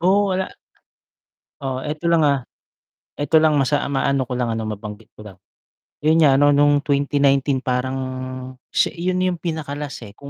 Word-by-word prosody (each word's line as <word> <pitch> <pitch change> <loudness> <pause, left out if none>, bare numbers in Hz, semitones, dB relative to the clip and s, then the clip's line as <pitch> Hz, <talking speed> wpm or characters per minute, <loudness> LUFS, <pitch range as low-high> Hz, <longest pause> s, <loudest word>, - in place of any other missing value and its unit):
Oo, 195 +4 +3
wala. 185 0 -1 1.1
Oh, 130 -1 -3
eto 150 +3 -4
lang, 170 -1 +4
ah. 140 -4 +1 0.7
Eto 145 +2 +3
lang, 155 -1 +3
masa 145 +1 +2
ah, - - -3
maano 135 -1 0
ko 125 - -3
lang 125 -2 -1
ano, 110 -1 -3
mabanggit 105 0 -7
ko 105 - -12
lang, 95 -3 -12 0.7
'yun 160 +1 +4
nga 135 -3 +5
ano 145 0 +5
no'ng 145 0 +4
2019 140 -1 +2
parang 130 0 -2 0.7
siya - - +1
'yun 180 +2 -1
'yung 180 -3 -1
pinaka-last, 150 -6 -5
eh. 100 - -12
Kung 140 +5 -12
140 Hz, 170 wpm, -21 LUFS, 130-155 Hz, 1.1 s, nga